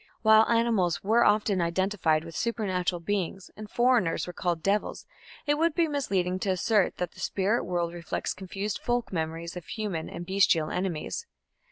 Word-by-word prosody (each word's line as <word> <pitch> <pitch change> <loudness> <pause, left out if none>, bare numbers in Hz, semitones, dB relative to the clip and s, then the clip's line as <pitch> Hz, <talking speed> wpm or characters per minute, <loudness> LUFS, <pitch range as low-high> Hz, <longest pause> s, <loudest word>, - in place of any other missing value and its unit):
While 220 0 +6
animals 230 -7 +2
were 225 +4 +4
often 210 -2 +3
identified 170 -2 +1
with 165 -1 -10
supernatural 185 -6 -1
beings, 195 0 -3
and 215 -1 -9
foreigners 240 -8 +2
were 180 - -7
called 170 -3 -2
"devils", 200 +1 -1 0.4
it 295 0 +1
would 330 -1 +2
be 335 -1 +3
misleading 190 - -1
to 195 - -2
assert 190 +2 +2
that 180 -1 -3
the - - -16
spirit 205 +5 0
world 175 -1 -1
reflects 170 -1 -3
confused 195 +2 -4
folk 240 -3 -1
memories 165 +1 -3
of 175 -3 -8
human 205 -7 -4
and 175 0 -7
bestial 185 -4 +2
enemies. 185 - -3
190 Hz, 165 wpm, -28 LUFS, 175-220 Hz, 0.4 s, While